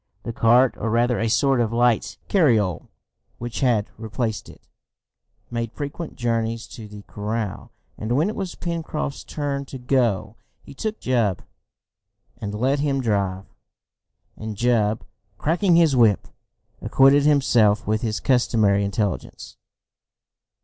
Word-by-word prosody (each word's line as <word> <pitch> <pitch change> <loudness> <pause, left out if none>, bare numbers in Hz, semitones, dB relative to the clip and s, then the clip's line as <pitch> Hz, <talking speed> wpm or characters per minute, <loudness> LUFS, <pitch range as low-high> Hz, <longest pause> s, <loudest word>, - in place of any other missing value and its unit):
The 115 - -5
cart, 120 +2 +4
or 115 - -2
rather 120 +2 +2
a 115 - 0
sort 135 +2 +2
of 115 -2 0
light 115 -4 +1
carriole 110 - +2 0.5
which 120 0 -5
had 120 -6 +1
replaced 110 0 -3
it, - - -16 0.9
made 115 -1 -3
frequent 145 +5 -6
journeys 115 -1 -1
to 110 -2 -9
the 105 0 -11
corral, 105 0 -4 0.3
and 110 +2 -2
when 155 +5 +2
it 215 - -3
was 190 -3 -4
Pencroft's 165 -4 -4
turn 140 -2 -3
to 135 - -8
go 115 -5 0 0.3
he 140 - -12
took 215 +10 -4
Jup, 115 -7 0 1.0
and 105 -2 -5
let 130 +6 +1
him 140 -1 0
drive, 100 -5 -1 0.9
and 110 -1 -7
Jup, 110 -2 +1 0.3
cracking 170 - +2
his 165 -5 +4
whip, 115 -5 +3 0.5
acquitted 135 +2 +5
himself 120 -8 +3
with 110 +1 0
his 110 -2 -2
customary 110 -6 +2
intelligence. 100 -1 -3
115 Hz, 130 wpm, -23 LUFS, 105-135 Hz, 1.0 s, acquitted